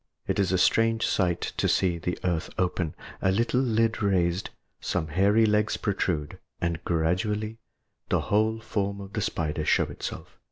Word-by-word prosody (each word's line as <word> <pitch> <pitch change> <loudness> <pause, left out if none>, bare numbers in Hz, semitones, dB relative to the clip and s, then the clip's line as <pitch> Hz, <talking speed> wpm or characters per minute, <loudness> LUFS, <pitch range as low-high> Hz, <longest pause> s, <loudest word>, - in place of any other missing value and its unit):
It - - -1
is 95 -2 +2
a 95 - +3
strange 115 +4 +3
sight 90 -3 +1 0.2
to - - +2
see 90 -3 +2
the 90 +2 -2
earth 85 -3 -1
open, 90 -3 -1 0.3
a 95 - +3
little 115 +5 +1
lid 115 -3 +1
raised, 95 -2 +1 0.3
some 80 -4 -2
hairy 100 +7 +4
legs 105 0 +2
protrude, 90 -7 -2 0.2
and 85 -1 -2
gradually, 105 +7 0 0.5
the - - +2
whole 110 +2 +1
form 100 -2 -2
of 100 0 -9
the 105 - -1
spider 80 -4 -1
show - - +3
itself. - - -7
95 Hz, 160 wpm, -27 LUFS, 85-110 Hz, 0.5 s, hairy